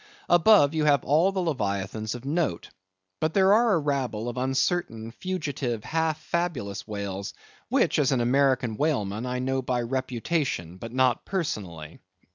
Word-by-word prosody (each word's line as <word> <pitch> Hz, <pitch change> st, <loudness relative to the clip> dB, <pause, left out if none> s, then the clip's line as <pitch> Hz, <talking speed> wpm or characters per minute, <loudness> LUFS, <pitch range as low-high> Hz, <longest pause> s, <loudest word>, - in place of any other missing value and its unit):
Above, 175 Hz, -4 st, +6 dB
you 155 Hz, -1 st, 0 dB
have 145 Hz, -3 st, +4 dB
all 160 Hz, +7 st, +3 dB
the 195 Hz, -, -2 dB
Leviathans 110 Hz, -, -2 dB
of 120 Hz, +1 st, -9 dB
note. 145 Hz, -, -1 dB, 0.5 s
But 155 Hz, 0 st, -1 dB
there 195 Hz, 0 st, +5 dB
are 230 Hz, 0 st, +4 dB
a -, -, +2 dB
rabble 130 Hz, -6 st, -2 dB
of 120 Hz, -, -6 dB
uncertain, 130 Hz, -3 st, -1 dB
fugitive, 145 Hz, -, -3 dB
half 160 Hz, -1 st, -1 dB
fabulous 150 Hz, -, -3 dB
whales, 100 Hz, -2 st, -5 dB, 0.3 s
which, -, -, +2 dB
as 140 Hz, -2 st, +2 dB
an 130 Hz, -, +2 dB
American 125 Hz, -2 st, +2 dB
whaleman, 125 Hz, -7 st, -1 dB
I 125 Hz, 0 st, -2 dB
know 130 Hz, +1 st, -1 dB
by 125 Hz, -1 st, -1 dB
reputation, 130 Hz, -, -2 dB
but 115 Hz, +4 st, -8 dB
not 130 Hz, -1 st, +2 dB
personally. 90 Hz, -, -4 dB
130 Hz, 150 wpm, -26 LUFS, 110-160 Hz, 0.5 s, Above